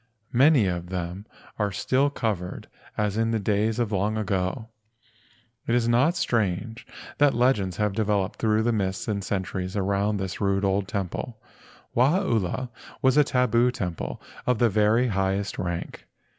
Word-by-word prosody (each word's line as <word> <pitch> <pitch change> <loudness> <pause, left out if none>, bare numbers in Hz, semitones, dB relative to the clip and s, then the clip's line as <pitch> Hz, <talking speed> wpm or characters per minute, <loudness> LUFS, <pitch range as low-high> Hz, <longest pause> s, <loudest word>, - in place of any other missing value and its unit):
Many 135 -1 +5
of 90 -1 -3
them 90 +3 -5 0.3
are 105 -1 +1
still 130 +8 +1
covered 105 -10 -3 0.3
as 105 -1 0
in 115 0 +1
the 115 - +1
days 105 +2 0
of 120 -3 0
the 105 - -1
long 105 +3 0
ago. 100 +2 -2 1.0
It 115 - +2
is 120 -1 +2
not 130 +9 +3
strange 115 - -1 0.3
that 145 -1 +4
legends 105 -8 +2
have 105 -2 0
developed 105 -2 0
through 110 0 +2
the 120 +1 +1
mists 95 -1 -2
of 105 -2 0
the - - -4
centuries 95 0 -3
around 100 +1 0
this 95 0 -4
rude 100 0 +1
old 95 0 +1
temple. 100 +4 -4 0.6
Wahaula 125 - +1 0.3
was 130 0 +4
a 150 - +6
tabu 125 -2 +2
temple 90 -8 -4 0.3
of 125 -2 +3
the 120 +1 +3
very 110 +4 +3
highest 95 0 -1
rank. 85 -1 -4
105 Hz, 155 wpm, -25 LUFS, 95-120 Hz, 1.0 s, a